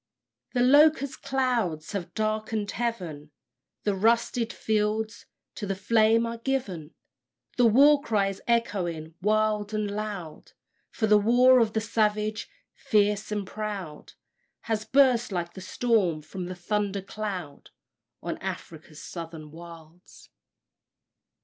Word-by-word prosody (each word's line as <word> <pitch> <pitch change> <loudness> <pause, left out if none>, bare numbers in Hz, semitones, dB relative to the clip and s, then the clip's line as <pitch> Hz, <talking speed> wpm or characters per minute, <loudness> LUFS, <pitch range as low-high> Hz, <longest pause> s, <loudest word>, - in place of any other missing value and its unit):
The 245 -1 +2
locust 285 +1 +4
clouds 235 - -1
have 200 -5 -5
darkened 215 -1 -1
heaven; 175 -11 -4 0.5
The 205 - +1
"rusted" 230 +3 +1
fields 220 +1 -1 0.3
to 205 - -6
the 195 - -1
flame 225 +3 +3
are 230 0 -5
given: 200 - -3 0.6
The 245 - +5
war 280 +6 +6
cry 210 -7 +1
is 195 - -8
echoing 180 -9 -1
wild 215 +1 +1
and 210 -1 -1
loud; 205 -7 -6 0.4
For 220 - -1
the 210 -1 +5
war 250 +4 +5
of 225 -2 +2
the 220 - 0
savage, 215 0 0 0.2
fierce 210 0 +1
and 205 -1 -2
proud, 195 -7 -6 0.5
Has 220 -1 -2
burst 255 -4 +3
like 170 -2 -3
the 190 - -9
storm 190 -6 0
from 180 +4 -6
the 185 - -6
thunder 200 +1 -2
cloud 195 -8 -6 0.5
On - - -4
Afric's 155 -2 -7
Southern 165 -3 -8
Wilds. 165 +1 -14
210 Hz, 125 wpm, -27 LUFS, 180-230 Hz, 0.6 s, war